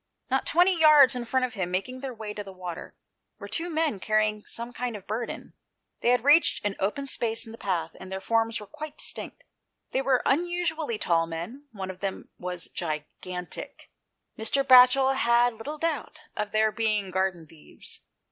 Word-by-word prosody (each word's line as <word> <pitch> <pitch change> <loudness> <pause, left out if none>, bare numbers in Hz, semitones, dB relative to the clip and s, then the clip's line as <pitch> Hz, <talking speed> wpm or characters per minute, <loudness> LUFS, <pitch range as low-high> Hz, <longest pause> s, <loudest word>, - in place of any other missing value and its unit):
Not 265 - +1
twenty 355 +3 +4
yards 300 -5 +7
in 245 -1 -3
front 255 +2 +1
of 245 - -7
him, 185 -5 -2
making 195 +8 -3
their 270 0 -5
way 220 -3 -6
to 210 - -5
the 195 - -10
water, 180 -2 -8 0.4
were - - -8
two 340 +1 -2
men 315 - 0
carrying 215 +1 +1
some 235 +1 -5
kind 245 -2 -3
of 195 - -14
burden. 225 +3 -5 0.5
They - - +1
had 250 -1 +3
reached 290 -4 +4
an 205 -1 0
open 215 +9 -1
space 230 -3 0
in 225 - -10
the 230 - -11
path, 170 -4 -2
and 190 0 -10
their 190 - -3
forms 225 +3 0
were 210 - -9
quite 310 +5 -9
distinct: - - -4 0.5
they 265 - +1
were 265 -2 +2
unusually 320 -5 0
tall 165 -4 +1
men; 180 - -7
one 190 -3 -5
of 185 - -14
them 195 0 -4
was 180 -1 -6
gigantic. 175 +3 -6 0.5
Mr. 225 +5 +1
Batchel 260 +1 +7
had 240 -1 +3
little 275 +8 -7
doubt 315 -4 -3
of 210 -1 -3
their 215 0 +3
being 215 -4 0
garden 190 -3 -1
thieves. 155 0 -12
225 Hz, 185 wpm, -27 LUFS, 190-270 Hz, 0.5 s, yards